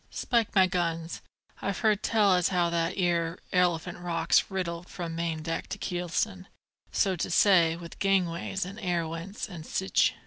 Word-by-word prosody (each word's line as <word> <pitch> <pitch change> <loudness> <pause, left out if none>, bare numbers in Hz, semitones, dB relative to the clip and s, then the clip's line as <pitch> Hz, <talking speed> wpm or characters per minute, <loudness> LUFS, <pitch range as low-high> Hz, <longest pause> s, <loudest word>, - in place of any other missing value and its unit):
Spike 235 -3 0
my 190 -1 +7
guns, 170 -2 -2 0.4
I've 200 -2 -2
heard 215 -3 +3
tell 210 -4 +3
as 180 -1 +3
how 175 -2 +1
that 170 +1 0
'ere 170 -2 +1 0.2
Elephant 175 -1 +1
Rock's 175 -1 +1
riddled 180 -3 -4
from 170 -2 -5
main 165 -2 -2
deck 165 +1 -3
to - - -5
keelson, 185 +1 -2 0.4
so 190 -2 +2
to 175 - -3
say, 175 -3 +5
with 170 0 -10
gangways, 190 -1 0
and 200 +4 -8
air 175 -5 0
wents, 165 +5 -5
an' 175 -5 -8
sich. 190 +3 +1
175 Hz, 165 wpm, -28 LUFS, 170-190 Hz, 0.4 s, my